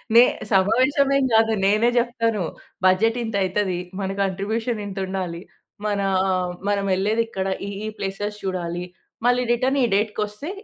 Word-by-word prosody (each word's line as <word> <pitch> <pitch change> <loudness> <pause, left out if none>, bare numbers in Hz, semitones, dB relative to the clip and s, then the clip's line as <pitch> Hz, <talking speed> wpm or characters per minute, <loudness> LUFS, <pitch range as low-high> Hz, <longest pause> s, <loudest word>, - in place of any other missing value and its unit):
నే 235 - +10 0.3
సమావేశం 260 +9 +3
ఏమి 270 -1 +2
కాదు. 225 0 +5
నేనే 215 +4 +4
జెప్తాను. 230 -4 +1 0.4
"బడ్జెట్ 215 +6 +4
ఇంత 225 -2 -4
అయితది. 185 -1 0 0.2
మన 190 -1 -2
కాంట్రిబ్యూషన్ 210 +4 -1
ఇంతుండాలి. 190 -3 -4 0.4
మనా 200 -2 0 0.6
మనం 200 -1 +1
ఎళ్ళేది 210 +4 +1
ఇక్కడ, 190 -3 -3 0.2
ఈ, - - -4 0.2
ఈ - - -2
ప్లేసెస్ 205 +2 -3
చూడాలి, 175 -2 -3 0.4
మళ్ళీ 250 0 +3
రిటర్న్ 260 +3 +1
ఈ - - +5
డేట్‌కొస్తే 210 - -2
210 Hz, 135 wpm, -23 LUFS, 190-230 Hz, 0.6 s, నే